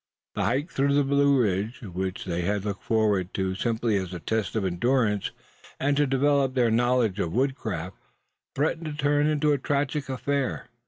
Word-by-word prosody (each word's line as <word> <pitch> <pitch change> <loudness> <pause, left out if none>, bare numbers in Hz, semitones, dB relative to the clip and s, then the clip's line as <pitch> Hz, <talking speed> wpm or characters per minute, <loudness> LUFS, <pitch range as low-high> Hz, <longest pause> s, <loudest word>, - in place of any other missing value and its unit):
The - - -1
hike 140 +7 0
through 140 +1 +1
the 145 - +4
Blue 140 0 +3
Ridge, 105 +3 -1
which 95 -1 -4
they 90 -1 -2
had 100 +3 -1
looked 100 -1 -3
forward 105 -5 +1
to 95 -1 0
simply 115 +1 0
as 95 -1 -4
a - - -5
test 110 +4 -2
of 105 -3 0
endurance, 105 +3 +1 0.5
and 145 +1 +1
to 145 0 +2
develop 135 0 +2
their 120 -3 +3
knowledge 120 -3 +2
of 85 -4 -1
woodcraft, 110 - -2 0.6
threatened 160 +3 0
to 150 - -4
turn 145 0 +2
into 150 0 +2
a 140 - 0
tragic 140 +1 -1
affair. 135 0 -2
120 Hz, 175 wpm, -26 LUFS, 100-140 Hz, 0.6 s, the